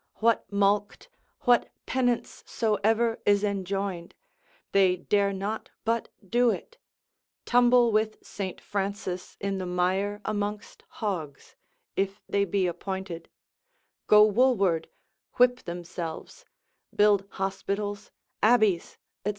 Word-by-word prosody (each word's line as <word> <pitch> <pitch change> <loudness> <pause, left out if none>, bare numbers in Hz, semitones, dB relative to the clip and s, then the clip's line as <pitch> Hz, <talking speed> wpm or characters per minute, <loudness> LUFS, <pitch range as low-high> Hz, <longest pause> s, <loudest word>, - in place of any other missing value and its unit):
What 225 -3 +1
mulct, 205 - +1 0.3
what 245 -2 +3 0.2
penance 245 -2 -1
soever 225 +1 +1
is 205 0 +3
enjoined, 195 -3 -3 0.6
they 190 -2 +4
dare 200 +2 +1
not 200 +3 -4 0.2
but 230 +1 0 0.2
do 240 +4 +3
it, 475 - -4 0.7
tumble 245 -1 +5
with 215 0 +1
St. 190 -3 -5
Francis 195 -2 -4
in 195 -1 -2
the 185 - -4
mire 190 +3 0
amongst 210 0 -3
hogs, 165 -10 -5 0.4
if 195 +1 -1
they 200 0 +1
be 195 0 0
appointed, 180 -1 -5 0.8
go 210 0 +8
woolward, 200 -8 +2 0.4
whip 245 0 +4
themselves, 170 - -6 0.5
build 205 -2 +4
hospitals, 200 +1 -3 0.3
abbeys, 215 -6 +3 0.3
&c. 205 - 0
200 Hz, 105 wpm, -27 LUFS, 190-220 Hz, 0.8 s, go